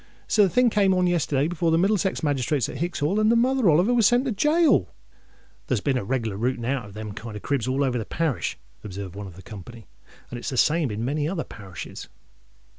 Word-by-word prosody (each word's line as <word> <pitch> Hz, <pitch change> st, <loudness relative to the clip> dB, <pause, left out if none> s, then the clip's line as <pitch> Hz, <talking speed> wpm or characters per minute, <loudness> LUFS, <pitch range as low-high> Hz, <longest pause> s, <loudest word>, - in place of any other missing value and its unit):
So 215 Hz, -, +3 dB
the 195 Hz, -, +5 dB
thing 250 Hz, +3 st, +3 dB
come 195 Hz, -3 st, +3 dB
on 180 Hz, 0 st, +2 dB
yesterday 150 Hz, -5 st, +1 dB
before 170 Hz, 0 st, 0 dB
the 165 Hz, -, +3 dB
Middlesex 190 Hz, 0 st, +1 dB
magistrates 140 Hz, -3 st, 0 dB
at -, -, -7 dB
Hicks's 170 Hz, +2 st, -3 dB
Hall, 165 Hz, +9 st, +1 dB
and 215 Hz, 0 st, +3 dB
Mother 240 Hz, -1 st, +3 dB
Oliver 175 Hz, +10 st, +4 dB
was 230 Hz, -4 st, +5 dB
sent 245 Hz, +2 st, +3 dB
to 260 Hz, -, 0 dB
gaol." 300 Hz, -, +3 dB, 0.8 s
"There's 125 Hz, -, +1 dB
been 135 Hz, +6 st, 0 dB
a 125 Hz, -, -1 dB
reglar 110 Hz, -2 st, -2 dB
rooting 120 Hz, +1 st, -1 dB
out 130 Hz, -2 st, -1 dB
of 100 Hz, -1 st, -13 dB
them 110 Hz, -1 st, -6 dB
kind 110 Hz, +1 st, -8 dB
of 105 Hz, -, -8 dB
cribs 135 Hz, -5 st, -1 dB
all 135 Hz, +2 st, +1 dB
over 125 Hz, -3 st, 0 dB
the 110 Hz, -, -4 dB
parish," 150 Hz, -, -2 dB, 0.3 s
observed 100 Hz, -2 st, -7 dB
one 100 Hz, 0 st, -6 dB
of 90 Hz, -, -11 dB
the 95 Hz, -, -13 dB
company; 110 Hz, +5 st, -11 dB, 0.5 s
"and 120 Hz, -, -5 dB
it's -, -, -4 dB
the 130 Hz, -, -4 dB
same 155 Hz, +2 st, +3 dB
in 105 Hz, +1 st, -4 dB
a -, -, -2 dB
many 145 Hz, +4 st, -1 dB
other 175 Hz, -3 st, -2 dB
parishes." 95 Hz, -5 st, -9 dB
140 Hz, 230 wpm, -24 LUFS, 115-190 Hz, 0.8 s, the